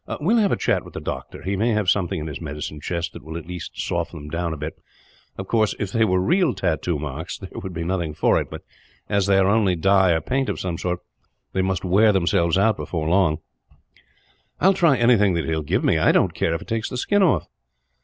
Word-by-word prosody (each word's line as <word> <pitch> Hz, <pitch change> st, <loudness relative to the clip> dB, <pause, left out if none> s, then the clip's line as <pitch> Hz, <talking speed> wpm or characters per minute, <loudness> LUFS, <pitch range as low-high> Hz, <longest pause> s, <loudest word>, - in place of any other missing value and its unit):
"We 170 Hz, +9 st, +1 dB
will 235 Hz, -, +4 dB
have 200 Hz, -, +2 dB
a -, -, +3 dB
chat -, -, 0 dB
with -, -, -14 dB
the -, -, -3 dB
doctor. -, -, -6 dB
He 95 Hz, +1 st, -1 dB
may 110 Hz, +4 st, +1 dB
have 105 Hz, -3 st, 0 dB
something 90 Hz, -3 st, +1 dB
in 75 Hz, -, -5 dB
his 75 Hz, -2 st, -6 dB
medicine 75 Hz, -1 st, -6 dB
chest 85 Hz, +2 st, -3 dB
that -, -, -9 dB
will 80 Hz, +2 st, -6 dB
at 85 Hz, -, -8 dB
least 90 Hz, -1 st, -8 dB
soften -, -, -2 dB
them 75 Hz, 0 st, -9 dB
down 85 Hz, +1 st, -2 dB
a 80 Hz, -, -4 dB
bit. 75 Hz, +2 st, -6 dB, 0.6 s
Of 95 Hz, -, -5 dB
course, 110 Hz, -2 st, +1 dB
if 100 Hz, -3 st, -3 dB
they 115 Hz, -, +2 dB
were 95 Hz, -3 st, +2 dB
real 160 Hz, -, +2 dB
tattoo 85 Hz, -3 st, -1 dB
marks 75 Hz, +3 st, -5 dB
there 95 Hz, -, -10 dB
would 95 Hz, -, -6 dB
be 85 Hz, -1 st, -4 dB
nothing 85 Hz, -3 st, -2 dB
for -, -, +3 dB
it; -, -, -7 dB
but -, -, -8 dB, 0.4 s
as 100 Hz, -2 st, +1 dB
they 100 Hz, -1 st, +4 dB
are 95 Hz, -, +4 dB
only 100 Hz, -3 st, +3 dB
dye, 95 Hz, +1 st, +4 dB
or 80 Hz, -, 0 dB
paint 130 Hz, -, -1 dB
of -, -, -3 dB
some 85 Hz, -3 st, -3 dB
sort, 90 Hz, -1 st, -2 dB, 0.5 s
they 95 Hz, -, +1 dB
must 95 Hz, -1 st, -1 dB
wear 105 Hz, +4 st, +5 dB
themselves 85 Hz, -2 st, +2 dB
out 105 Hz, +2 st, +3 dB
before 80 Hz, -3 st, -3 dB
very 80 Hz, -, -1 dB
long." 90 Hz, -5 st, +3 dB, 1.2 s
"I -, -, 0 dB
will 195 Hz, -, +7 dB
try 170 Hz, -8 st, +3 dB
anything 110 Hz, -6 st, +4 dB
that 85 Hz, -, -1 dB
he -, -, -3 dB
will 80 Hz, -1 st, 0 dB
give 75 Hz, -, -1 dB
me. -, -, +3 dB
I -, -, +4 dB
don't -, -, +2 dB
care 80 Hz, -, 0 dB
if 80 Hz, -, -5 dB
it -, -, -20 dB
takes 115 Hz, 0 st, -2 dB
the 125 Hz, -, -5 dB
skin 205 Hz, +10 st, +1 dB
off." 165 Hz, -, +2 dB
95 Hz, 255 wpm, -23 LUFS, 80-105 Hz, 1.2 s, will